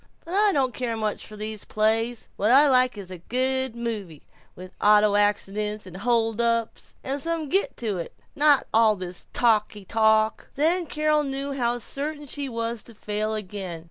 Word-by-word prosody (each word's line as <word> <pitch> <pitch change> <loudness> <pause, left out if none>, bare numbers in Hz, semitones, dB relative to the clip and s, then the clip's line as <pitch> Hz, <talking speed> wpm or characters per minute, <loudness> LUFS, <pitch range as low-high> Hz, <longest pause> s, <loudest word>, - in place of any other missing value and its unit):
But 335 - -7
I 415 +2 +4
don't 265 -7 +1
care 235 -3 -3
much 215 -1 -3
for 215 - -11
these 215 0 -5
plays. 225 +2 0
What 210 - 0
I 280 +4 +7
like 255 -3 +3
is 190 -2 -8
a 180 - -7
good 260 +4 -1
movie, 210 -10 -5 0.3
with 185 +1 -11
auto 210 0 +5
accidents 210 0 0
and 185 -1 -10
hold 225 +1 +1
ups, 230 -1 -1
and 275 +2 -2
some 330 -1 -2
git 385 +5 0
to 210 -6 -2
it, 170 - -6
and - - -37
not 290 -1 +4
all 220 -1 +5
this 180 -2 -7
talky 215 -3 +1
talk." 220 +1 +2
Then 330 +4 +1
Carol 305 0 +1
knew 275 0 -3
how 240 -3 0
certain 295 +4 -4
she 280 0 -5
was 230 -1 -3
to 230 - -15
fail 215 +1 -3
again. 190 -4 -6
230 Hz, 180 wpm, -25 LUFS, 210-270 Hz, 0.3 s, I